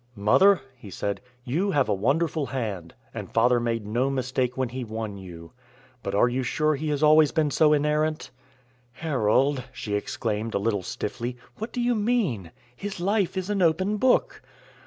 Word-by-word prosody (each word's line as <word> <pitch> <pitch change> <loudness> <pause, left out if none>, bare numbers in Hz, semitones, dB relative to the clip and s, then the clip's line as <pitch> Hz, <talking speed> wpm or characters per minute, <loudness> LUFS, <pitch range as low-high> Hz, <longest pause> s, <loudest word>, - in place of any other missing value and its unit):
"Mother," 150 - +5
he 110 -5 -12
said, 100 +1 -3 0.2
"you 165 +12 0
have 145 -8 +2
a 105 - +1
wonderful 140 - 0
hand. 100 -10 -4 0.2
And - - -7
father 120 +2 +3
made 115 -2 -2
no 120 +6 0
mistake 130 -1 -1
when 130 -2 0
he 130 +1 -5
won 110 -3 -5
you. 85 -3 -10 0.5
But 100 -2 -3
are 105 - +5
you 125 +2 -1
sure 155 +4 +1
he 150 +2 -3
has 145 0 -1
always 155 0 +6
been 155 -3 +1
so 150 +2 +4
inerrant?" 150 0 +1 0.6
"Harold," 135 -2 +1
she 110 -4 -5
exclaimed, 110 +1 -2
a - - +4
little 100 -1 0
stiffly, 120 +2 -4 0.2
"what 220 +2 -4
do 245 - -4
you 245 0 +2
mean? 205 - 0 0.3
His 200 +7 -6
life 195 0 0
is 190 +2 -2
an 200 -2 0
open 185 +5 +2
book." 255 +4 +2
130 Hz, 175 wpm, -26 LUFS, 110-160 Hz, 0.6 s, always